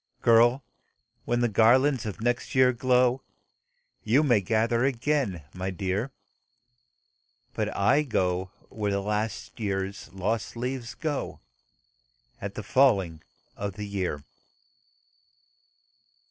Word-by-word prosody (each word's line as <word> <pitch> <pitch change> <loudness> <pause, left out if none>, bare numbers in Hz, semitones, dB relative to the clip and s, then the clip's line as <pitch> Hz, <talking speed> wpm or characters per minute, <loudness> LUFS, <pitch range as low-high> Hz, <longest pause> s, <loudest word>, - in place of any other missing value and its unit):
Girl! 120 +3 +5 0.6
when 120 0 0
the 120 - +3
garlands 120 +3 +3
of 105 - -6
next 120 +3 -1
year 130 -1 +5
glow, 125 +1 +2 0.8
YOU 125 +8 +3
may 120 -8 +3
gather 115 +4 +1
again, 130 - 0
my 95 +1 -3
dear 95 +6 -2 1.4
But - - -2
I 130 +9 +4
go 95 -9 0 0.2
where 105 -2 -3
the 100 - 0
last 105 +3 -3
year's 100 -2 -3
lost 100 +4 -2
leaves 125 -1 -4
go 150 -3 -3 1.0
At - - -5
the - - -5
falling 95 - +2 0.3
of 100 -1 -4
the 105 -1 -5
year." 95 -8 -3
115 Hz, 110 wpm, -27 LUFS, 100-125 Hz, 1.4 s, Girl